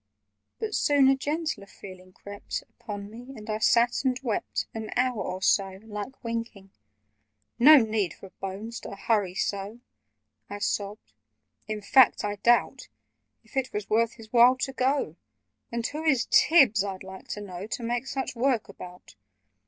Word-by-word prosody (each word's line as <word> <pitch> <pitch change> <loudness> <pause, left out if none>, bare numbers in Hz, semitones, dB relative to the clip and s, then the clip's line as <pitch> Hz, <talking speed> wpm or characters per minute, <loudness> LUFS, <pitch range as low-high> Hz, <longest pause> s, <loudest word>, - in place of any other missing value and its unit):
But 440 -1 -4
soon 285 -6 +4
a 270 - +5
gentler 295 -6 -3
feeling 185 -2 -13
crept 200 +2 -7
Upon 205 -1 -8
me, 245 +5 -11
and 215 0 -11
I 215 - -2
sat 235 +3 +3
and 255 -2 0
wept 225 -5 -2
An 220 -1 -6
hour 250 -3 +1
or 185 +1 -4
so, 190 -1 +2
like 215 +5 -7
winking. 230 -4 -5 0.9
"No 300 +5 +9
need 215 -6 -1
for 195 - -13
Bones 200 +5 -6
to - - -8
hurry 200 -3 0
so!" 200 +4 -3 0.7
I 205 - -5
sobbed. 205 - -3 0.5
"In 215 -1 -4
fact, 260 +2 +5
I 205 0 -2
doubt 240 +4 +2 0.6
If - - -21
it 265 -1 -1
was 210 0 -5
worth 230 +1 +2
his 225 -1 -15
while 245 +2 +6
to 270 +1 -3
go— 260 - 0 0.5
And 235 -1 -3
who 305 +4 -3
is 275 -7 +2
Tibbs, 260 - +5
I'd 195 -2 -5
like 190 0 -11
to 210 - -5
know, 190 -1 -7
To 235 - -5
make 240 +2 -2
such 265 -1 -3
work 240 -3 0
about? 180 - -12
220 Hz, 160 wpm, -27 LUFS, 200-255 Hz, 0.9 s, No